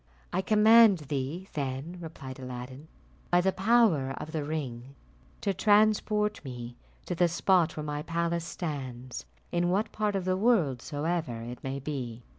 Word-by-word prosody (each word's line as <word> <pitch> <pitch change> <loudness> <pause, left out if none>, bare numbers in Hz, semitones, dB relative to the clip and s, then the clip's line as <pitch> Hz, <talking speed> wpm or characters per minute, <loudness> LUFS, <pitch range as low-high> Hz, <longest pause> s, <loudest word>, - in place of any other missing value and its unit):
"I 185 - +1
command 215 0 +6 0.2
thee, 145 +8 -3
then," 140 +4 -4
replied 140 -6 -8
Aladdin, 130 +3 -8 0.4
"by 175 - +4
the 190 +2 +2
power 190 - +3
of 155 - -6
the 155 -2 -2
ring, 135 -4 -5 0.5
to 200 - 0
transport 210 +1 +3
me 120 -3 -7 0.3
to - - -3
the 175 0 +3
spot 175 -1 +2
where 150 - -3
my 150 0 -3
palace 170 +1 -1
stands, 130 -7 -5 0.2
in 175 0 +1
what 200 +4 0
part 210 -1 -1
of 190 -2 -1
the 185 0 +1
world 185 - +2
soever 155 -5 -2
it 120 +2 -8
may 135 +1 -3
be." 125 -5 -5
160 Hz, 155 wpm, -29 LUFS, 135-190 Hz, 0.5 s, command